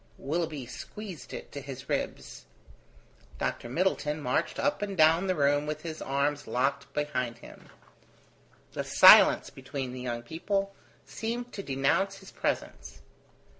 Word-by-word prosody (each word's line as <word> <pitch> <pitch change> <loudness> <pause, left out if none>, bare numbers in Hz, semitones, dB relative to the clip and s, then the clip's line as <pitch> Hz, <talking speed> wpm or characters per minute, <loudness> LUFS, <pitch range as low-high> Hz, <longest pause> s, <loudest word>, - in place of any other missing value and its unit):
Willoughby 155 -2 -3
squeezed 195 - -9
it - - -8
to 140 - -6
his 135 -2 -8
ribs. - - -4 0.9
Dr. 120 - -3
Middleton 150 -1 0
marched 145 +4 -1
up 285 -4 0
and 200 -2 -3
down 165 +4 +5
the 185 - +1
room 145 0 +2
with 155 0 -4
his 160 -2 -6
arms 140 +1 -1
locked 140 +4 -1
behind 125 -5 -2
him. - - -14 1.0
The - - -3
silence - - +7
between 130 -1 -6
the 130 - -6
young 120 -1 -4
people 195 - -2 0.3
seemed 240 +2 -5
to 200 - -5
denounce 165 +7 0
his 195 -1 -13
presence. - - -4
150 Hz, 135 wpm, -29 LUFS, 135-185 Hz, 1.0 s, silence